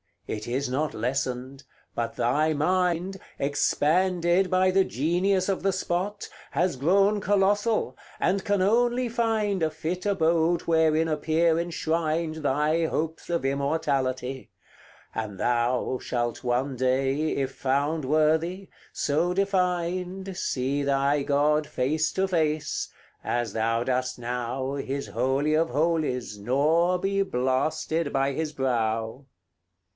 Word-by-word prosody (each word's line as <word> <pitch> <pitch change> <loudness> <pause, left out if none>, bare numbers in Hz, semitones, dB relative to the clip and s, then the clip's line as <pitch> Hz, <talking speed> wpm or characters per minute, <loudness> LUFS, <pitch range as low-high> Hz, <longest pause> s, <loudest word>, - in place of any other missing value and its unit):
it 105 0 -5
is 130 +3 -1
not 145 +4 -1
lessened; 130 +2 -3 0.3
but 115 -1 -3
thy 145 +7 +1
mind, 180 +4 0 0.2
Expanded 175 +5 +2
by 185 0 +3
the 190 0 +3
genius 180 - +1
of 195 - 0
the 195 0 +1
spot, 190 +3 -2 0.2
Has 170 0 0
grown 195 +8 +3
colossal, 205 +3 +1 0.2
and 190 +2 +1
can 205 -1 +1
only 240 +5 +2
find 220 -5 0
A 160 - +2
fit 160 +4 -4
abode 170 -3 +2
wherein 160 -1 +2
appear 160 +2 +2
enshrined 165 -1 -1
Thy 150 +3 +1
hopes 160 +1 -3
of 170 -5 0
immortality; 135 -2 -1 0.6
and 105 -3 -4
thou 120 +3 0
Shalt 120 0 -3
one 125 +2 0
day, 135 +4 +1
if 135 -1 -2
found 145 +3 0
worthy, 160 +6 +1 0.2
so 160 +5 0
defined, 185 0 -1
See 135 -3 -1
thy 140 +1 +1
God 150 +2 +2
face 155 +5 0
to 190 0 +1
face, 155 -4 0 0.4
as 120 -3 -1
thou 115 +1 0
dost 130 0 -1
now 125 +2 -3
His 140 0 -4
Holy 140 +4 0
of 165 +1 +2
Holies, 145 -6 -1
nor 155 - +2
be 195 +2 0
blasted 145 +1 0
by 135 0 +1
his 155 +2 -2
brow. 115 -1 -1
155 Hz, 120 wpm, -26 LUFS, 130-180 Hz, 0.6 s, by